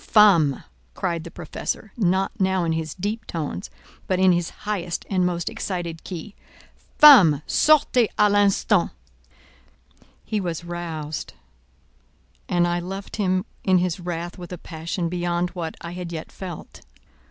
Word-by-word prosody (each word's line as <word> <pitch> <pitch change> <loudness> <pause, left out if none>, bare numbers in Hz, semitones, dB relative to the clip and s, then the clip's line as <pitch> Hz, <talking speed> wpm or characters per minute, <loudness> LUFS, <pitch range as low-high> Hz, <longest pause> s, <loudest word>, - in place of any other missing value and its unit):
"Femme!" 175 - +5 0.3
cried 170 -3 -2
the - - -7
Professor, 175 +5 -5
not 190 -3 +1
now 190 -1 +2
in 165 - 0
his 160 -1 -3
deep 210 +4 -4
tones, 150 - -4 0.4
but 185 - +1
in 185 0 +5
his 175 -1 0 0.2
highest 185 -5 -3
and 185 -2 +2
most 175 -1 -3
excited 170 -4 -4
key, 185 +3 -7 0.6
"Femme! 190 - +8
sortez 285 -6 +4
à 210 - +5
l'instant!" 205 -1 +3 1.4
He 215 -2 -1
was 170 -2 -4
roused, 165 -3 -5 1.2
and 175 -1 +2
I 175 0 0
loved 195 +4 -6
him 185 -2 +1 0.2
in 185 -1 +4
his 180 0 0
wrath 175 0 -5
with 175 0 -9
a 180 - -5
passion 170 +1 -4
beyond 175 0 -1
what 170 -3 -5
I 170 - -6
had 175 -1 -6
yet 160 -2 -6
felt. 180 -4 -9
175 Hz, 140 wpm, -23 LUFS, 170-190 Hz, 1.4 s, Femme